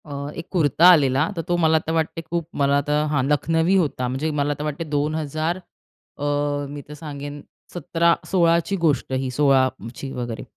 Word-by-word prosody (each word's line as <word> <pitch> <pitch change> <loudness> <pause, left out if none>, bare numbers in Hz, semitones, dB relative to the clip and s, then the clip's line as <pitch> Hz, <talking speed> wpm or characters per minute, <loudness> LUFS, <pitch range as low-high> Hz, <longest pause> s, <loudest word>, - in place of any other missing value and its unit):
अ, 150 - -11 0.3
एक 165 - -8
कुर्ता 165 -2 +3
आलेला, 135 -6 +4
तर 165 - -2
तो 175 - +1
मला 160 0 +4
तर 160 - -2
वाटते 165 0 -1
खूप 170 0 -3 0.2
मला 140 0 +3
तर 150 +1 0
हां, 145 -4 +1
लखनवी 165 +5 +2
होता. 145 -8 0
म्हणजे 135 +5 -2
मला 145 +1 +1
तर - - -3
वाटते, 150 +2 -3
2000 155 +2 -2 0.6
अ, 145 - -4 0.4
मी 145 0 -7
तर 150 - -9
सांगेन 145 -1 -7 0.3
17 170 0 +2 0.2
16ची 170 0 +2
गोष्ट 160 -6 0
ही 130 0 -1
16ची 130 -2 0
वगैरे. 120 -2 -5
150 Hz, 170 wpm, -22 LUFS, 140-165 Hz, 0.6 s, आलेला